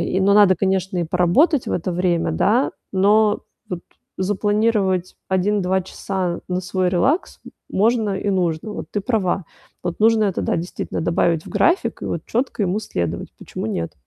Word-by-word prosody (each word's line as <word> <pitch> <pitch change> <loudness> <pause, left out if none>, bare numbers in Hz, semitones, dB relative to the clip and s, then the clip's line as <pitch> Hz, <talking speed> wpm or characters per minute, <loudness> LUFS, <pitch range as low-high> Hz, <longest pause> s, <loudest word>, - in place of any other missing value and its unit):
и, 175 +2 0
но 200 +1 +4
надо, 200 -3 +6
конечно, 190 0 0
и 175 - +1
поработать 180 - +3
в - - -2
это 180 +1 -1
время, 175 -1 +1
да. 240 +6 +2 0.2
Но 210 +2 +3 0.3
вот 180 -2 -3 0.4
запланировать 205 -1 +1
1-2 190 0 +1
часа 185 -1 -3
на 180 0 -1
свой 185 0 0
релакс 260 - +1
м - - -11 0.2
можно 220 +1 +2
и - - -3
нужно. 180 +1 -1
Вот, - - -6
ты 205 - -1
права. 195 -4 0 0.4
Вот, 175 +2 -3
нужно 220 0 +4
это, 195 -3 -1
да, - - 0
действительно, 170 +2 -4
добавить 165 -1 +1
в - - -8
график 345 +3 +1
и - - -3
вот - - -3
чётко 240 -2 -1
ему 195 +2 0
следовать. 85 - -3
Почему - - -6
нет? 85 -6 -3
190 Hz, 170 wpm, -21 LUFS, 180-210 Hz, 0.4 s, надо